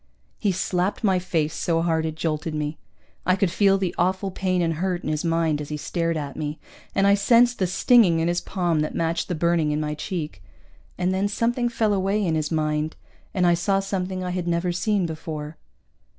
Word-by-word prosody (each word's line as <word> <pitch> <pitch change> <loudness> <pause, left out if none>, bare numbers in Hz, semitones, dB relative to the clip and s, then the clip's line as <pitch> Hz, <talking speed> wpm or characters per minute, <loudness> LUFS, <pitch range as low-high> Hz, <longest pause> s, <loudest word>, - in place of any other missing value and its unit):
He 205 - +1
slapped 185 +2 -1
my 190 -3 +3
face 160 -4 -1
so 165 -1 0
hard 160 -1 +1
it 155 - -4
jolted 155 0 -2
me. 150 0 -3 0.4
I 185 - +3
could 190 -2 +1
feel 195 +2 +4
the 190 -3 -1
awful 190 +2 +1
pain 185 0 0
and 165 -1 +1
hurt 185 -2 -1
in - - -3
his 155 -1 -1
mind 165 -3 +1
as 145 - -7
he 150 - -3
stared 165 +1 -1
at 145 -2 -5
me, 150 0 -4 0.4
and 195 - +3
I 200 - +6
sensed 235 +4 +4
the 185 - +2
stinging 190 -1 +4
in 165 - +1
his 175 0 0
palm 175 -4 0
that 150 - -2
matched 165 0 -1
the 175 - -2
burning 170 -1 +2
in 150 0 0
my 150 0 -2
cheek. 155 - -5 0.6
And 180 +1 0
then 195 +2 +1
something 240 +4 0
fell 220 -3 +1
away 200 +2 +1
in 165 - +1
his 155 -1 0
mind, 155 0 0 0.4
and 185 -2 +1
I 175 - +5
saw 195 +3 +1
something 190 -1 -3
I 180 - -2
had 180 -1 -3
never 170 +1 0
seen 195 +1 0
before. 155 -1 -6
175 Hz, 210 wpm, -24 LUFS, 160-190 Hz, 0.6 s, I